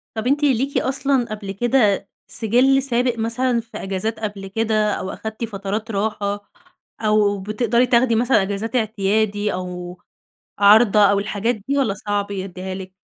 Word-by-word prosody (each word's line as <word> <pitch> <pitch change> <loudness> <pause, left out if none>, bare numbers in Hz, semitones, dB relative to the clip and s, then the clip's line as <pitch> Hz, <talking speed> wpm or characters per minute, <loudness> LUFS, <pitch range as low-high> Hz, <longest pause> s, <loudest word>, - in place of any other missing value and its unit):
طب 220 +2 -2
أنتِ 290 +3 +1
ليكِ 275 0 +1
أصلًا 270 -1 +1
قبل 210 -2 -5
كده 210 -2 +1 0.2
سِجِل 255 +5 +2
سابق 245 -2 +1
مثلًا 235 +2 0
في 230 +1 -11
أجازات 195 +3 -3
قبل 205 -3 -5
كده 215 +1 0
أو 185 - -4
أخدتِ 220 +3 -6
فترات 210 +1 -4
راحة 205 0 -3 0.5
أو 210 -2 +2
بتقدري 220 +4 +1
تاخدي 240 -1 +3
مثلًا 240 -1 +3
أجازات 200 +5 -3
اعتيادي 210 -2 0
أو 180 -1 -6 0.6
عارضة 210 +1 +6
أو 200 - +2
الحاجات 210 +3 -1
دي 280 +1 +1
والّا 235 -8 +1
صعب 205 0 -3
يدّيها 190 -1 -5
لِك؟ 185 0 -8
215 Hz, 145 wpm, -21 LUFS, 200-240 Hz, 0.6 s, عارضة